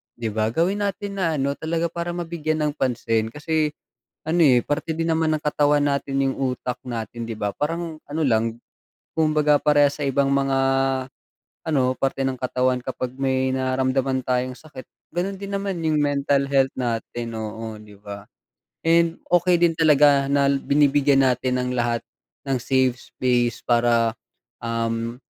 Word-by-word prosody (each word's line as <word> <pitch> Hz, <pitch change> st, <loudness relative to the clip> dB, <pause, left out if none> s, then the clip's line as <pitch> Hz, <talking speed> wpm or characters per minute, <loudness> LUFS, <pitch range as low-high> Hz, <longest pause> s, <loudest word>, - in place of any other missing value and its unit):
'di 115 Hz, -1 st, -3 dB
ba. 110 Hz, +1 st, -1 dB
Gawin 190 Hz, +8 st, +1 dB
natin 200 Hz, 0 st, -4 dB
na 165 Hz, -4 st, 0 dB
ano 140 Hz, 0 st, -1 dB
talaga 165 Hz, +1 st, -1 dB
para 170 Hz, +1 st, -4 dB
mabigyan 165 Hz, -2 st, -2 dB
ng -, -, -5 dB
pansin 115 Hz, -3 st, -1 dB
kasi 155 Hz, 0 st, -1 dB, 0.5 s
ano 165 Hz, +2 st, +1 dB
eh 130 Hz, -5 st, +6 dB
parte 150 Hz, +3 st, -2 dB
din 165 Hz, 0 st, -1 dB
naman 160 Hz, 0 st, +1 dB
ng -, -, -14 dB
katawan 145 Hz, -1 st, +2 dB
natin 140 Hz, -1 st, -1 dB
yung 135 Hz, -, 0 dB, 0.2 s
utak 125 Hz, -, -5 dB
natin 120 Hz, -1 st, -5 dB
'di 110 Hz, -, -5 dB
ba. 105 Hz, -1 st, -2 dB
Parang 165 Hz, +1 st, -3 dB
ano 155 Hz, +2 st, -2 dB
lang 115 Hz, -2 st, +1 dB, 0.6 s
kumbaga 150 Hz, -2 st, +3 dB
parehas 145 Hz, -1 st, +4 dB
sa -, -, 0 dB
ibang 135 Hz, +1 st, +2 dB
mga 135 Hz, -1 st, +1 dB, 1.1 s
ano 135 Hz, -5 st, +1 dB
parte 135 Hz, 0 st, -1 dB
ng 135 Hz, -1 st, -1 dB
katawan 130 Hz, 0 st, 0 dB
kapag 130 Hz, -1 st, -4 dB
may 130 Hz, -1 st, +1 dB
nararamdaman 130 Hz, 0 st, 0 dB
tayong 125 Hz, 0 st, -1 dB
sakit 150 Hz, -4 st, -11 dB, 0.3 s
ganun 190 Hz, +3 st, -2 dB
din 200 Hz, +1 st, -7 dB
naman 200 Hz, -2 st, -2 dB
yung 155 Hz, -1 st, +2 dB
mental 140 Hz, -1 st, +1 dB
health 135 Hz, -1 st, +2 dB
natin 115 Hz, -1 st, -3 dB
oo 110 Hz, 0 st, -6 dB
'di 105 Hz, -1 st, -14 dB
ba 100 Hz, -1 st, -8 dB, 0.6 s
and 165 Hz, 0 st, +3 dB, 0.2 s
okey 175 Hz, 0 st, +4 dB
din 170 Hz, -1 st, +4 dB
talaga 145 Hz, -3 st, +5 dB
na 140 Hz, 0 st, +3 dB
binibigyan 140 Hz, 0 st, +3 dB
natin 125 Hz, 0 st, +1 dB
ang 125 Hz, 0 st, -2 dB
lahat 120 Hz, -1 st, 0 dB, 0.5 s
ng 135 Hz, -1 st, +1 dB
safe 130 Hz, -1 st, +2 dB, 0.2 s
space 120 Hz, -2 st, 0 dB
para, 120 Hz, -1 st, +3 dB, 0.5 s
um 115 Hz, 0 st, -2 dB
135 Hz, 155 wpm, -23 LUFS, 125-155 Hz, 1.1 s, eh